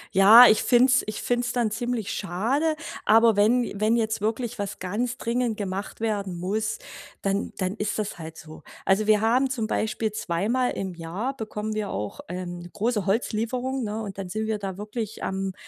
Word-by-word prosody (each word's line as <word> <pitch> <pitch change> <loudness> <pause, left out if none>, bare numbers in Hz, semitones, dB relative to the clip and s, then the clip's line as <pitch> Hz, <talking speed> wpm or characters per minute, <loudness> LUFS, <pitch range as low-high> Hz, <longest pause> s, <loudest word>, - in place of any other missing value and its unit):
Ja, 215 +6 +10
ich 215 - +4
finde 245 0 +5
es 260 - +4
ich 215 - -4
finde 245 0 +1
es 240 - -2
dann 235 -3 +1
ziemlich 230 -1 -2
schade, 240 - 0 0.3
aber 225 0 +5
wenn 225 +5 +4
j 205 -3 -6
wenn 220 +2 +3
jetzt 220 -3 0
wirklich 230 +2 -2
was 200 -1 -3
ganz 230 +7 -2
dringend 235 -1 -1
gemacht 195 +1 -5
werden 200 -5 -2
muss, 210 +5 -1 0.5
dann 195 +1 -1
dann 185 -1 -1
ist 210 0 -2
das 210 -4 -3
halt 160 0 -8
so. 155 0 -11 0.2
Also, 200 +2 +2
wir 215 -1 +4
haben 250 +4 +3
zum 240 -4 -2
Beispiel 215 0 -1
zweimal 220 +6 0
im 190 -2 -4
Jahr 180 +11 -4
bekommen 215 -3 -4
wir 215 -2 -2
auch, 105 0 -4
ähm, 175 -1 -6
große 210 -1 -1
Holzlieferung, 245 +5 -1
ne, 215 +1 -3
und 195 -2 -7
dann 190 -2 -5
sind 215 +4 -2
wir 220 -1 -1
da 195 -2 -5
wirklich 215 +1 -5
am 190 0 -2
215 Hz, 190 wpm, -25 LUFS, 195-235 Hz, 0.5 s, Ja